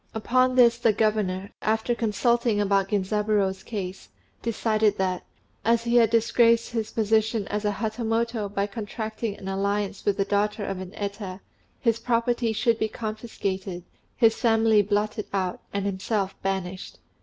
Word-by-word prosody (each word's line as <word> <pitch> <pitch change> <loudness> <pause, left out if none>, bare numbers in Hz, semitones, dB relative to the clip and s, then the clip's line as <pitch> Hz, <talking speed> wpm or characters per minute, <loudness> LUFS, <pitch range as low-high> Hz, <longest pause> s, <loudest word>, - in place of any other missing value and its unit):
Upon 255 +3 +2
this 235 -2 +5
the 230 -3 +3
governor, 205 -3 0
after 220 +2 +1
consulting 235 0 +1
about 195 -1 +2
Genzaburô's 205 -1 0
case, 195 -4 -6 0.3
decided 220 -2 +1
that, 185 -1 -1 0.4
as 230 +2 +2
he 235 +1 +2
had 230 -2 +5
disgraced 230 +1 +3
his 225 -2 -2
position 220 -1 +1
as 210 +1 -2
a 205 - +1
Hatamoto 225 0 -1
by 200 0 -1
contracting 215 0 -5
an 190 - -9
alliance 200 +1 -1
with 205 -1 +1
the 195 - +1
daughter 205 +1 0
of 195 -1 -3
an 185 +1 -8
Eta, 200 -2 -5 0.4
his 230 -2 +1
property 235 0 +1
should 230 +1 +1
be 220 - +1
confiscated, 200 -5 -4 0.3
his 225 -3 +5
family 225 -2 +3
blotted 210 +1 -1
out, 185 -2 -1
and 200 0 -2
himself 195 0 -1
banished. 190 -1 -3
215 Hz, 145 wpm, -25 LUFS, 200-230 Hz, 0.4 s, this